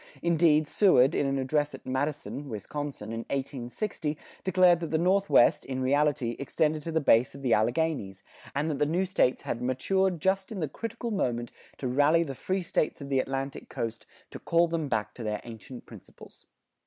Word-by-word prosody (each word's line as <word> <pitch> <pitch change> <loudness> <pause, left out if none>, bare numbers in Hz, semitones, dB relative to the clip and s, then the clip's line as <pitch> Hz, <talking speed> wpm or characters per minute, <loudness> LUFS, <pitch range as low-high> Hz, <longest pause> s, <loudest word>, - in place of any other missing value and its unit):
Indeed, 160 -3 +3
Seward, 150 -7 +4
in 140 - +1
an 135 0 0
address 145 +3 0
at - - -14
Madison, 145 +1 -3
Wisconsin, 115 +1 -5
in 115 - -3
1860, 140 - -3 0.3
declared 180 -2 +4
that 165 -2 -4
the 160 - +1
Northwest, 185 -4 +4
in 130 -1 -4
reality, 135 -3 +1
extended 155 +2 0
to 165 - -5
the 160 - +2
base 125 -4 +3
of 140 - -10
the 125 -3 +2
Alleghanies, 115 -4 0 0.3
and 145 +3 0
that 140 - -3
the 150 - +2
new 175 +5 +1
States 180 -8 +1
had 115 - -3
"matured 175 +9 0
just 190 +4 0
in 210 - -5
the 155 - -1
critical 230 - -5
moment 120 - -1 0.3
to 130 - -3
rally 145 +6 +3
the 140 -4 -5
free 185 +8 -2
States 155 - -1
of 140 -1 -8
the 135 -1 +2
Atlantic 135 +1 -4
coast, 115 -1 -5 0.2
to - - -8
call 170 +1 +2
them 165 -2 -2
back 105 -3 -1
to 120 - -8
their 105 -1 -2
ancient 120 +2 -10
principles." - - -14
145 Hz, 185 wpm, -28 LUFS, 130-170 Hz, 0.3 s, Seward